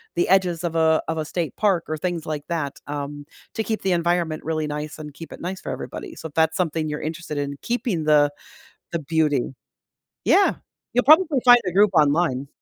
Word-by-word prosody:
the 175 - +1
edges 180 -3 +2
of 165 -1 -2
a 160 -1 +3
of 160 0 -2
a 155 - -2
state 165 0 -3
park 195 -6 +2
or 155 - -3
things 170 0 -3
like 150 -2 -4
that, 150 -5 -2
um, 145 0 -5 0.3
to 220 - -2
keep 220 0 -3
the 190 - +1
environment 170 -2 0
really 155 -1 -1
nice 150 0 -5
and 150 -2 -9
keep 165 +1 -10
it - - -9
nice 185 +2 -5
for - - -5
everybody, 335 - -7
so, 160 - -7
if - - -23
that's 160 0 +2
something 160 -3 -1
you're 150 0 -4
interested 155 -1 -5
in, 140 0 -2
keeping 225 -9 -2
the 145 -1 +4 0.6
the 170 - -1
beauty. 150 -4 0 0.7
Yeah. 400 - +4 0.4
You'll 245 - +3
probably 315 +5 +7 0.2
find 245 0 +9
a - - 0
group 200 +2 +4
online. 145 -3 +2
160 Hz, 205 wpm, -23 LUFS, 150-180 Hz, 0.7 s, find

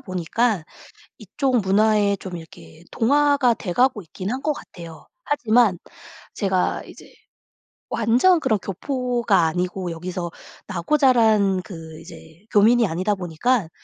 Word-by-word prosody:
보니까 185 +1 -1 0.5
이쪽 260 -4 -1
문화에 205 +1 +2
좀 180 -2 -7
이렇게 160 0 -14
동화가 280 0 +3
돼가고 225 +4 0
있긴 185 +5 -6
한 260 - -3
것 305 - +2
같아요. 165 - -12 0.2
하지만 230 - +2 0.6
제가 190 -3 0
이제 - - -15 0.8
완전 245 +11 +3
그런 215 -8 +1
교포가 235 - 0
아니고 180 +2 -3
여기서 175 +1 -5 0.4
나고 185 - 0
자란 220 -8 +3
그 165 -5 -10
이제 165 +2 -15
교민이 225 +2 +4
아니다 185 +5 -1
보니까 185 +3 -1
200 Hz, 265 characters per minute, -22 LUFS, 175-245 Hz, 0.8 s, 교민이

